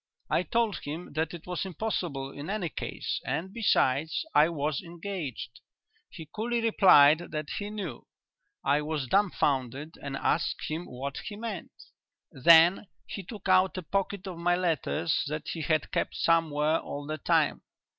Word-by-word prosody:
I - - +3
told 210 0 0
him 155 +4 -7
that 160 +2 -1
it 170 -2 -9
was 180 -1 -3
impossible 175 -8 -3
in 145 +4 -8
any 195 -5 -2
case, - - -4
and, 185 +5 -3
besides, 160 - +1
I 155 - +6
was 150 -3 -2
engaged. 170 - -6 0.5
He 160 - -10
coolly 235 +2 -1
replied 180 -9 +6
that 155 -1 -4
he 205 0 -4
knew. 210 -1 -6 0.6
I 145 +1 +3
was 150 -2 -2
dumbfounded 145 - 0
and 140 -1 -4
asked 160 - 0
him 160 +3 -4
what 135 +2 -5
he 210 - -5
meant. 215 -4 -6 0.6
"Then 165 +7 +6 0.2
he 200 - -6
took 200 +1 -9
out 185 0 +4
a 185 - -4
packet 195 +3 -2
of 180 -3 -6
my 175 +1 +2
letters 165 -2 0
that 150 +1 -4
he 165 - -4
had 155 +1 0
kept - - -1
somewhere 160 -1 +2
all 145 0 -6
the 155 +1 -4
time. - - +2
165 Hz, 155 wpm, -28 LUFS, 150-190 Hz, 0.6 s, I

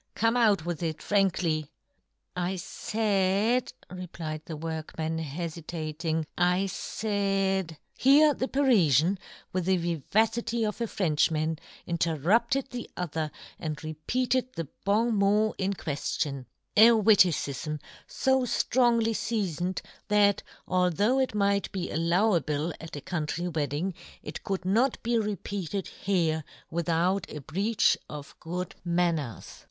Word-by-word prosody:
Come, 230 +2 +2
out 210 -8 +3
with 175 -2 -3
it 160 -2 -2
frankly 175 -7 +1 0.2
!" - - -48
" - - -51
I 190 - -3
faid," 210 +4 0 0.2
replied 170 -4 -6
the 160 - -6
workman, 160 0 -4
hefitating, 160 0 -3
" - - -38 0.2
I 190 +2 +1
faid 195 -3 -1
— - - -49
" - - -33
Here 295 +2 +7
the 260 - -2
Parifian, 195 - +3 0.3
with 185 -2 -1
the 190 0 +3
viva 170 +5 +2
city 230 0 -2
of 210 +2 -3
a 230 - 0
Frenchman, 160 -4 +1 0.3
interrupted 180 - +1
the 245 -2 -6
other, 160 -3 -2 0.3
and 155 -2 -4
repeated 245 +12 -1
the 165 -3 -4 0.2
bon 220 +3 +2
mot 210 +2 +3
in 195 +1 0
queflion 140 -4 -3 0.2
— - - -50
a 220 +2 +9
witticifm 170 -8 +3 0.3
fo 265 0 +2
flrongly 235 -2 +2
fea 210 -8 -1
foned, 180 +3 -3 0.2
that, 205 -1 +4 0.3
although 185 +7 +2
it 260 -4 0
might 200 -1 +1
be 185 -3 -3
al 155 - -1
lowable 170 -3 +1
at 165 -1 -8
a 145 - -6
country 170 +2 -2
wedding, 155 +2 -1 0.3
it - - -7
could 195 -3 -3
not 235 +8 +2
be 235 0 +2
repeated 200 -3 -3
here 165 -5 0 0.3
without 170 +3 0
a 150 - -6
breach 195 - +2
of 145 -1 -8
good 180 +2 -4
manners. 170 -7 -1
185 Hz, 135 wpm, -28 LUFS, 160-215 Hz, 0.3 s, a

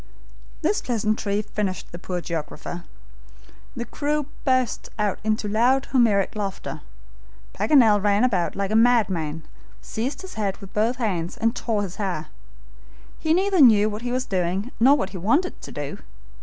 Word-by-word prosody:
This 210 - +1
pleasantry 215 -3 0
finished 200 -4 -3
the 175 - -8
poor 180 -1 -4
geographer. 170 +1 -5 0.9
The 235 - -4
crew 295 +2 -1 0.2
burst 255 -3 +1
out 210 -2 0
into 215 0 0
loud 245 +6 +3
Homeric 220 -7 +3
laughter. 200 -2 -4 0.7
Paganel 225 -9 +4
ran 205 +2 +3
about 190 -9 +1
like 200 0 -2
a - - +1
madman, 190 -10 +2 0.4
seized 265 +10 -4
his 380 - -8
head 200 -3 -2
with 195 -2 -12
both 225 +4 +1
hands 185 -9 -2
and 230 +1 +1
tore 215 -3 -1
his 190 -2 -6
hair. 180 -7 -3 0.9
He 315 - 0
neither 375 +1 +3
knew 215 -4 +6
what 210 +1 -5
he 245 0 -3
was 255 +1 -1
doing 190 +5 -1
nor 270 +5 +6
what 190 -8 -2
he 190 - -6
wanted 290 - +1
to - - -9
do. 145 -1 -5
215 Hz, 155 wpm, -24 LUFS, 195-245 Hz, 0.9 s, knew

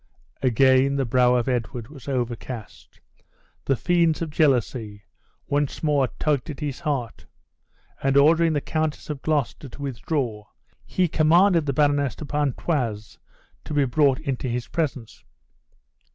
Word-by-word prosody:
Again 130 +2 +4
the 135 -1 0
brow 125 +1 +3
of 120 0 0
Edward 120 -2 -2
was 140 -4 -13
overcast. 120 -3 -5 0.7
The 135 - +2
fiends 170 +2 +2
of 160 - -5
jealously 120 -8 0 0.4
once 145 +1 -1
more 145 -4 +2
tugged 145 -3 0
at 150 - -6
his 145 -4 -4
heart; 140 -9 -3 0.7
and 135 0 +2
ordering 160 +3 +5
the 145 - 0
Countess 155 0 -2
of 140 -3 -6
Gloucester 145 -2 -1
to 145 - -12
withdraw 125 -5 -3 0.4
he 185 -1 +1
commanded 165 +1 +4
the - - +2
Baroness 145 -2 +2
de 155 - -7
Pontoise 140 -6 -2 0.4
to 150 - -6
be 145 -1 +3
brought 135 +1 +2
into 135 -4 -3
his 120 0 -3
presence. 140 -9 -4
140 Hz, 135 wpm, -24 LUFS, 125-150 Hz, 0.7 s, ordering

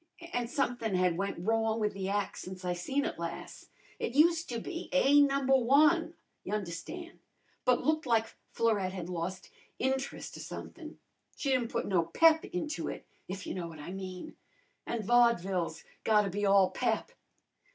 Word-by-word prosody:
An' 245 -1 0
somethin' 240 -5 -1
had 180 -2 +2
went 195 +3 -2
wrong 225 0 +1
with 210 -1 0
the 195 -1 -3
ac' 205 0 -1
since 185 0 -8
I 180 - 0
seen 270 - -1
it - - -4
las'. - - -6 0.3
It 240 - -3
useter 320 -5 +3
be 335 +7 -6
A 280 +1 +5
Number 275 -1 +3
I, 275 +4 +5 0.4
y' - - -6
un'erstan', 210 - -5 0.5
but 250 -1 +3
looked 310 -2 +1
like 225 -2 +2 0.2
Florette 205 -5 +1
had 180 -2 -5
lost 180 +2 -4 0.3
int'rust 265 +1 -2
or - - -8
somethin'. - - -8 0.4
She 275 - -1
didn't 250 -3 +2
put 235 - -1
no 185 -4 +2
pep 320 - +5
into 300 - -3
it, - - -6 0.2
if 185 0 -6
you - - -4
know 175 -2 -4
what 165 -1 -10
I 150 +4 -7
mean. 185 -1 -7 0.5
An' 230 -2 -2
vodvil's 195 -8 +2 0.2
gotta 210 -3 +3
be 205 +2 0
all 195 -2 +5
pep. 480 - -1
220 Hz, 165 wpm, -31 LUFS, 185-265 Hz, 0.5 s, A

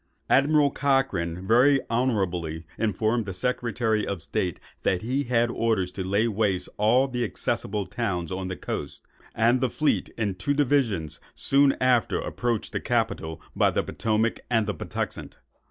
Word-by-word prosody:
Admiral 145 +1 +4
Cochrane 95 - 0
very 130 +5 +5
honourably 90 -10 -1
informed 110 +1 0
the 95 - -4
Secretary 115 -1 0
of 95 -5 -4
State 90 +1 -2 0.2
that 90 0 0
he 130 +5 -1
had 120 -1 +2
orders 110 -7 0
to 95 +1 -4
lay 100 +5 +1
waste 105 -4 0
all 120 +6 +4
the 125 -2 -2
accessible 105 -2 -2
towns 90 -9 -3
on 95 0 -3
the 95 - -4
coast; - - -5 0.3
and 120 +3 +3
the 130 - +2
fleet, 150 +6 0
in 105 -4 0
two 95 +10 -1
divisions, 115 - +1 0.2
soon 140 0 +5
after 125 -2 +2
approached 120 -3 -2
the - - -2
capital 110 -9 -1 0.2
by - - +4
the - - 0
Potomac 110 +1 0
and 115 -3 +2
the - - -2
Patuxent. - - -5
115 Hz, 155 wpm, -26 LUFS, 95-125 Hz, 0.3 s, very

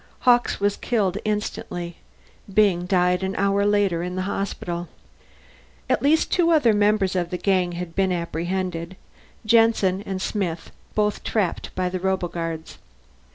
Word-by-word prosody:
Hawkes 245 -1 +3
was 205 0 +1
killed 205 -5 0
instantly; 180 -5 -3 0.5
Byng 190 -4 +3
died 180 -1 +2
an 190 0 -2
hour 200 +1 +2
later 200 -5 +2
in 180 +1 -4
the 185 - -1
hospital. 175 -3 -3 1.0
At - - +1
least 300 +4 +3
two 345 -2 +3
other 295 -9 +4
members 205 -2 +2
of 175 -2 0
the 180 - -3
gang 185 -2 +1
had 175 -1 -6
been 190 -1 +2
apprehended 175 +1 -3 0.5
Jensen 215 -4 +3
and 195 -2 -4
Smith, 185 -5 -3 0.2
both 210 -1 0
trapped 205 -6 -1
by 185 0 0
the 185 +1 -3
roboguards. 175 -3 -3
190 Hz, 140 wpm, -23 LUFS, 175-205 Hz, 1.0 s, other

